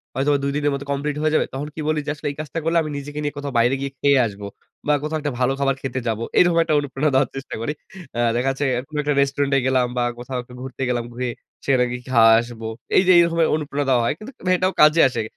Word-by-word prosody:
হয়তোবা 140 +2 +2
২ 140 - 0
দিনের 145 0 +1
মধ্যে 140 +1 -5
কমপ্লিট 140 +1 -2
হয়ে 155 0 +1
যাবে। - - +3
তখন 140 +3 -4
কি - - -8
বলি 155 -1 +1
যে, - - -4
"আসলে 150 - -6
এই 140 - -11
কাজটা 155 +2 -5
করলে 165 +1 +1
আমি 155 - -4
নিজেকে 145 +1 -6
নিয়ে 145 - -2
কোথাও 140 -1 -5
বাইরে 120 +3 +3
গিয়ে 140 0 -3
খেয়ে 140 -1 +4
আসব। 100 -1 -10 0.5
বা 150 - +4
কোথাও 155 +1 -2
একটা 145 - -2
ভালো 130 +1 +2
খাবার 135 -1 +1
খেতে 130 -1 -3
যাবো।" 115 0 -1 0.2
এরকম 175 -2 +4
একটা 165 -2 -1
অনুপ্রেরণা 145 +1 -1
দেওয়ার 130 -1 +3
চেষ্টা 135 - -6
করি। 150 +6 -2 0.4
আ - - -1 0.2
দেখা 130 +3 +1
যাচ্ছে 135 +2 -2 0.2
কোনো 150 - -7
একটা 145 0 +1
রেস্টুরেন্টে 140 0 +1
গেলাম 130 -1 +2
বা 120 - +2 0.2
কোথাও 125 +1 -5
একটু 125 - -15
ঘুরতে 130 -1 -8
গেলাম, 120 -1 0
ঘুরে 125 +1 -3 0.4
সেখানে 130 -3 +3
গিয়ে 125 0 -6
খাওয়া 115 -2 +6
আসব। 120 -1 -10 0.4
এই - - +6
যে 185 - +7
এইরকমের 170 -1 +4
অনুপ্রেরনা 145 -2 -2
দেওয়া 125 -2 +4
হয়। - - +1
কিন্তু 215 +8 -10 0.3
এটাও 185 +1 +1
কাজে 155 +2 +6
আসে। 120 -3 -3
140 Hz, 245 wpm, -22 LUFS, 130-150 Hz, 0.5 s, যে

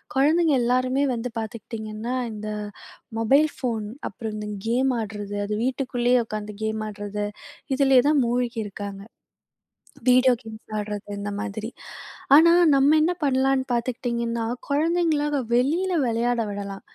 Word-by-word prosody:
குழந்தைங்க 305 +3 +4
எல்லாருமே 255 +3 +1
வந்து 240 +1 -4
பாத்துக்கிட்டீங்கன்னா, 220 +1 -5 0.2
இந்த 215 0 -6 0.7
மொபைல் 275 +7 +4
ஃபோன், 230 -5 -2 0.2
அப்புறம் 215 +1 -6
இந்த 210 0 -5 0.2
கேம் 255 +3 +2
ஆட்றது. 205 -1 -5
அது 210 - -3
வீட்டுக்குள்ளயே 250 -2 +1
உக்காந்து 210 -1 -5
கேம் 220 0 -1
ஆட்றது. 205 0 -4 0.5
இதிலேயே 265 -2 +5
தான் 300 -2 +4
மூழ்கி 240 0 -1
இருக்காங்க. 200 -1 -7 1.1
வீடியோ 255 +1 +6
கேம்ஸ் 220 -1 -12
ஆட்றது 210 -1 -5
இந்த 205 0 -4
மாதிரி. 220 +1 -4 0.7
ஆனா, 330 +3 +8 0.2
நம்ம 280 +3 +5
என்ன 325 +3 +3
பண்ணலான்னு 265 -1 +2
பாத்துக்கிட்டீங்கன்னா, 235 -1 -1 0.2
குழந்தைங்களாக 300 -1 +1 0.2
வெளியில 310 +10 +2
விளையாட 240 +1 0
விடலாம். 200 -1 -6
240 Hz, 120 wpm, -24 LUFS, 215-270 Hz, 1.1 s, ஆனா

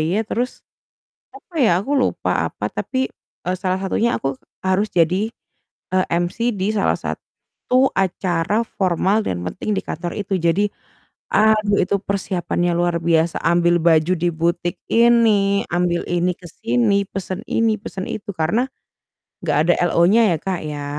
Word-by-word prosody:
ye, - - +2
terus, 245 +4 -3 0.7
apa 360 - -16
ya, 230 - +5
aku 265 - -5
lupa 260 - 0 0.2
apa, - - -4
tapi, 260 0 -2 0.4
eee, 180 +1 -1
salah 185 0 -1
satunya 225 +5 +1
aku 135 0 -2 0.3
harus 190 +3 +1
jadi, 180 +6 +2 0.6
eee, 185 0 +3
MC 175 +8 0
di 195 +1 -1
salah 200 - +1
satu 255 +1 -2
acara 185 +2 0
formal 195 +1 +1
dan 90 -1 -2
penting 215 - -4
di - - 0
kantor 170 +2 -5
itu. 200 -1 -1
Jadi, 175 +5 +2 0.6
aduh, 215 -1 +3
itu 200 - 0
persiapannya 180 -3 -1
luar 175 0 +1
biasa, 165 0 +2
ambil 170 +1 +3
baju 165 +1 +4
di 175 +2 +1
butik 170 +1 -1 0.2
ini, 225 -4 +4
ambil 175 -1 +1
ini 175 +1 +1
kesini, 170 +2 0
pesen 190 0 -5
ini, 225 -1 +2
pesen 190 -1 -6
itu. 205 0 -5
Karena, 180 +10 +1 0.8
nggak 150 -4 +1
ada 175 - +6 0.2
LO-nya 185 +7 +5
ya, - - -3
Kak, 190 -2 -3
ya, 145 -1 -5
185 Hz, 145 wpm, -20 LUFS, 170-210 Hz, 0.8 s, ada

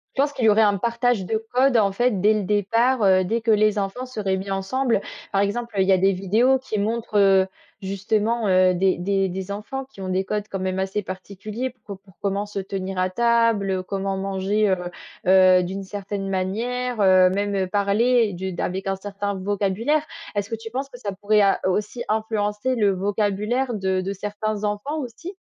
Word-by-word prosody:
Je 270 - +2
pense 285 0 +1
qu'il 255 -5 -1
y - - +7
aurait 210 +1 +5
un 205 -1 +3
partage 235 -1 0
de 220 +3 0 0.2
code, 255 -1 +4
en 200 -2 +3
fait, 230 -3 0
dès 210 +2 +5
le 210 -2 -1
départ, 230 +5 +1
heu, 185 -1 +5
dès 225 +5 -1
que 225 0 +2
les 215 0 +3
enfants 200 +6 -3
seraient 200 -6 -2
mis 195 +1 -6
ensemble. 205 +4 0 0.3
Par 195 - +2
exemple, 230 +3 -2
il 190 0 +3
y - - +4
a 190 - +5
des 195 +2 +3
vidéos 220 +8 +2
qui 255 -5 -4
montrent, 220 0 -1
heu, 195 -1 +5 0.4
justement, 210 +4 0 0.3
des 185 +1 +2
des 195 +1 0
des 190 +2 -5
enfants 260 +7 -5
qui 230 -7 -14
ont 185 - -4
des 185 +1 0
codes, 210 +1 -3
quand 195 - -3
même, 185 0 -2
assez 190 +2 -2
particuliers, 200 +6 -5 0.2
pour 200 -2 -8
pour 195 -2 -22
comment 200 +1 -1
se 205 - -8
tenir 190 -1 -4
à 185 0 0
table, 230 -4 +2
comment 195 +1 -3
manger, 195 +2 0
heu 190 - +3 0.5
heu, 185 -1 +6
d'une 190 +2 -4
certaine 195 0 -5
manière, 230 +6 -2
heu, 185 -2 +6
même 200 0 -1
parler 215 +3 +2
du 190 +1 -4
d'avec 190 +2 -3
un 195 - 0
certain 200 +1 -4
vocabulaire. 205 +9 0 0.3
Est-ce 205 +1 -2
que 225 - -2
tu 225 0 -9
penses 270 +2 -3
que 245 - -11
ça 205 -4 -4
pourrait 205 +2 +2
a 195 -1 +3
aussi 210 +5 -1
influencer 215 +2 -1
le 210 -4 +3
vocabulaire 210 +6 -1
de 190 -2 0
de 195 +2 -3
certains 210 +1 -4
enfants 210 +9 -2
aussi? 275 - -7
205 Hz, 200 wpm, -23 LUFS, 190-225 Hz, 0.5 s, y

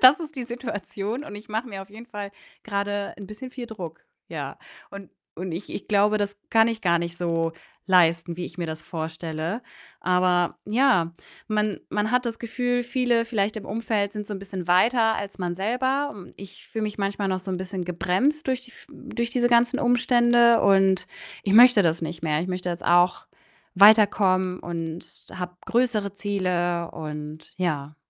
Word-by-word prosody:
Das 260 +6 +8
ist 315 -2 -7
die 255 - -3
Situation 230 0 -5
und 255 - -9
ich 205 +1 -10
mache 220 +4 -2
mir 195 -3 -6
auf 195 - -16
jeden 225 +3 -11
Fall 205 -4 -6 0.3
grade 205 -1 -2
'n 200 - -8
bisschen 215 +6 -9
viel 250 -1 -7
Druck, 180 -8 -8 0.2
ja. - - -6 0.3
Und 200 -2 -9 0.3
und 180 +2 -4
ich 175 +5 -6
ich - - -7
glaube, 210 +1 +3
das 205 0 -2
kann 225 0 +5
ich 225 -1 -3
gar 170 -2 +3
nicht 170 0 -5
so 165 -1 0 0.4
leisten, 170 -2 +3
wie 180 - -4
ich 165 - -12
mir 170 - -2
das 160 -1 -5
vorstelle. 160 +5 -4 0.4
Aber, 180 -1 +2
ja, 210 -7 +3 0.4
man 210 -1 0
man 210 +1 0
hat 250 0 +3
das 230 -1 -3
Gefühl, 245 +1 -1
viele 245 -2 +1
vielleicht 215 -2 0
im 215 - -6
Umfeld 215 -2 -1
sind 210 -1 -5
so - - -4
'n - - -5
bisschen 190 -3 -6
weiter 225 +5 +4
als 200 0 -6
man 175 -2 -2
selber. 260 +8 0
Hm, 195 -4 -12
ich 195 0 -12
fühle 220 - -4
mich 210 0 -4
manchmal 200 0 -1
noch 185 -1 -1
so 190 - -6
'n 185 - -1
bisschen 185 0 -4
gebremst 190 - 0
durch 260 -1 +1
die 250 - -15
v - - -16
durch 235 -4 -4
diese 240 0 +2
ganzen 240 +2 +3
Umstände 240 -1 +4
und 195 -1 +4 0.4
ich 195 - +1
möchte 240 -2 +8
das 165 -1 +1
nicht 165 0 -5
mehr. 155 -1 +1
Ich 175 - -3
möchte 180 0 -3
jetzt 170 - -5
auch 175 +1 +3 0.5
weiterkommen 195 -2 +5
und 165 -1 -5 0.3
habe 180 -1 -6
größere 230 -5 +1
Ziele, 180 -4 -1
und 150 0 -7
ja. 150 -5 -2
200 Hz, 185 wpm, -25 LUFS, 180-230 Hz, 0.5 s, Das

